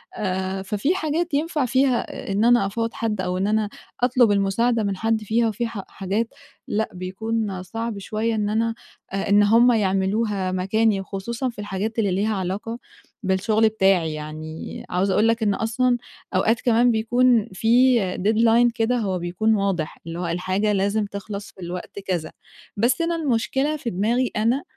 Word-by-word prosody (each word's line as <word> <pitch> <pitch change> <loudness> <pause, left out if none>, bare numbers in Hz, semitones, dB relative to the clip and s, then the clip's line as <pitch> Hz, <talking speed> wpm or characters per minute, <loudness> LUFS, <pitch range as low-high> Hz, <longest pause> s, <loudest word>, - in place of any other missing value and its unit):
آآ 190 -1 -2
ففي 210 - 0
حاجات 330 -1 -1
ينفَع 300 -1 0
فيها 255 -4 0
إن 205 +3 +2
أنا 240 -4 +5
أفوّض 225 +3 -2
حد 215 -4 -2
أو 180 0 -2
إن 190 +2 0
أنا 215 0 +1 0.3
أطلُب 245 -3 +4
المساعدة 215 +4 +1
من 200 -2 -1
حد 225 +1 0
فيها 225 +2 +1
وفي 225 +2 -2
ح 220 -4 -6
حاجات 200 +4 -2 0.4
لأ، 220 +1 -1
بيكون 195 +1 -3
صعب 225 +3 -4
شويّة 220 +3 -2
إن 210 -1 0
أنا 225 +2 +1 0.4
آآ 195 +1 -2
إن 205 +1 +6
هُم 230 +4 +5
يعملوها 195 -1 0
مكاني 195 +2 +1
خصوصًا 230 +7 -4
في 235 - -11
الحاجات 205 +2 -3
اللي 205 -4 +1
ليها 210 +4 0
علاقة 200 +5 -3 0.4
بالشغل 215 +3 +2
بتاعي، 190 -6 +2
يعني 155 +1 -7
عاوزة 190 +2 +1
أقول 215 +2 +3
لك 225 0 +1
إن 205 -2 +2
أصلًا 240 +4 +1 0.4
أوقات 225 +5 +2
كمان 240 0 +4
بيكون 235 0 +3
في 245 +6 +4 0.2
deadline 225 +4 +4
كده 235 +2 +1
هو 195 -5 -1
بيكون 180 +6 +1
واضح، 195 -6 -1
اللي 165 +1 -5
هو 175 - -2
الحاجة 185 +5 0
لازم 205 +2 +1
تخلَص 200 0 -7
في 190 - -16
الوقت 180 +3 -6
كذا. 180 -5 -3 0.5
بس 240 +9 +2
أنا 335 0 0
المشكلة 280 0 0
في 265 -5 -4
دماغي 230 +6 0
أنا 230 +6 +1
215 Hz, 165 wpm, -23 LUFS, 195-230 Hz, 0.5 s, إن